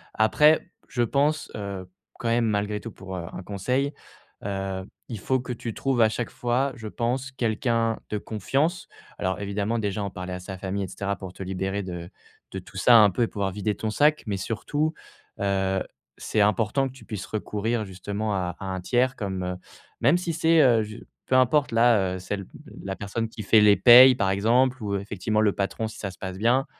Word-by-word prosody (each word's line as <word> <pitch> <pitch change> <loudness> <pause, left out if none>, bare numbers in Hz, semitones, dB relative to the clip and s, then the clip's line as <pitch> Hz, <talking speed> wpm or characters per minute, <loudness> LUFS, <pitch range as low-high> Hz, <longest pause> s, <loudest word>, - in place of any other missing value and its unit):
Après, 150 +8 +4 0.2
je 120 -2 0
pense, 145 +5 0
heu, 100 -3 -5 0.3
quand 115 - -2
même 115 0 +2
malgré 105 -1 -1
tout 115 +1 -8
pour, 95 -1 -8
heu, 85 -2 -5
un 95 - -7
conseil, 125 +9 -1 0.5
heu, 95 -1 -3 0.2
il 115 -4 -6
faut 130 +6 0
que 125 0 -5
tu 115 -1 -5
trouves 135 -3 0
à 110 - +6
chaque 120 +2 -3
fois, 125 +3 0
je 110 -2 -8
pense 125 +4 -2
quelqu'un 115 -1 0
de 105 - -1
confiance. 140 - -1 0.3
Alors 95 +1 -1
évidemment 100 +3 -2
déjà 105 -1 -2
en 100 - -2
parler 90 0 -6
à 90 - -5
sa 95 +1 -8
famille 95 +1 -3
et - - -4
cetera, 100 +2 -3
pour 95 0 -8
te 95 - -7
libérer 95 +2 -3
de 90 -1 -6 0.4
de 95 - -4
tout 95 - -16
ça, 120 +5 +6
hein, 110 - +9
un 100 - +3
peu 105 - -2
et - - +1
pouvoir 100 -2 -2
vider 105 +2 -2
ton 110 -1 -3
sac. 150 +5 +3
Mais 100 -3 -2
surtout, 145 - -2 0.5
heu, 95 -1 0 0.3
c'est 105 - 0
important 110 +6 +2
que 130 - -10
tu 130 - -15
puisses 105 -4 -5
recourir 110 +1 -2
justement 100 +3 -4
à 90 -2 -2
à - - -6
un 95 0 -3
tiers 125 +6 +1
comme, 95 -3 -3
heu, 90 0 -3 0.5
même 175 - +5
si 175 -1 -3
c'est 160 0 +4
heu, 120 -5 +5
je 110 +1 -8 0.3
peu 130 - +2
importe 130 +3 +3
là, 110 -6 +3
heu, - - -6
celle 100 +1 -4 0.4
la 95 0 -4
personne 115 +3 -3
qui 110 - -8
fait 110 +2 +5
les 105 -1 +7
paies 125 +5 +9
par 95 -5 0
exemple 120 +6 +2
ou 100 -1 -1
effectivement 100 +2 -1
le 105 -2 +4
patron 100 +3 -2
si 110 - -11
ça 100 - -4
se 95 - -16
passe 95 -1 -6
bien, 125 +5 +2
105 Hz, 210 wpm, -25 LUFS, 95-120 Hz, 0.5 s, hein